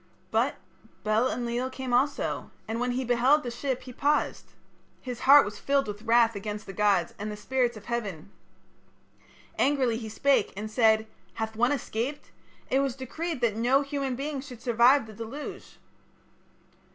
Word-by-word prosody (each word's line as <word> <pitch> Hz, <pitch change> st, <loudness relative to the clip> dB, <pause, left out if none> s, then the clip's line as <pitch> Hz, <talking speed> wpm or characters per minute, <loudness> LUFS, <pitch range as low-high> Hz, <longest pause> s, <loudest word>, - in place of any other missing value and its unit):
"But 235 Hz, +6 st, +1 dB, 0.5 s
Bel 215 Hz, +4 st, +2 dB
Enlil 240 Hz, +1 st, -2 dB
came 260 Hz, -1 st, -5 dB
also, 275 Hz, +4 st, 0 dB, 0.2 s
and 225 Hz, +1 st, -3 dB
when 245 Hz, 0 st, 0 dB
he 255 Hz, +1 st, -2 dB
beheld 250 Hz, +5 st, +3 dB
the 245 Hz, -, -4 dB
ship 255 Hz, +1 st, -3 dB
he 255 Hz, -, -10 dB
paused. 295 Hz, +4 st, 0 dB, 0.5 s
His 250 Hz, -2 st, -6 dB
heart 285 Hz, 0 st, +9 dB
was 205 Hz, 0 st, -7 dB
filled 275 Hz, -2 st, +1 dB
with 210 Hz, 0 st, -6 dB
wrath 230 Hz, 0 st, +4 dB
against 210 Hz, +1 st, -5 dB
the 195 Hz, -, -8 dB
gods 200 Hz, -4 st, +2 dB
and 210 Hz, +1 st, -4 dB
the 210 Hz, -, -6 dB
spirits 245 Hz, +1 st, 0 dB
of 210 Hz, -, -12 dB
heaven. 200 Hz, -7 st, -4 dB, 1.3 s
Angrily 265 Hz, -5 st, +2 dB
he 225 Hz, -2 st, -6 dB
spake 275 Hz, +1 st, +2 dB
and 215 Hz, +1 st, -5 dB
said: 220 Hz, -1 st, +4 dB, 0.3 s
'Hath 220 Hz, 0 st, -3 dB
one 240 Hz, +4 st, +2 dB
escaped? 270 Hz, 0 st, -3 dB, 0.4 s
It 265 Hz, -, +4 dB
was 275 Hz, -3 st, 0 dB
decreed 300 Hz, +3 st, -4 dB
that 230 Hz, -3 st, +2 dB
no 250 Hz, +5 st, +3 dB
human 275 Hz, -2 st, -2 dB
being 280 Hz, +1 st, -3 dB
should 250 Hz, -4 st, -11 dB
survive 245 Hz, +2 st, +5 dB
the 220 Hz, -, -11 dB
deluge.' 230 Hz, +7 st, -8 dB
240 Hz, 165 wpm, -27 LUFS, 220-270 Hz, 1.3 s, heart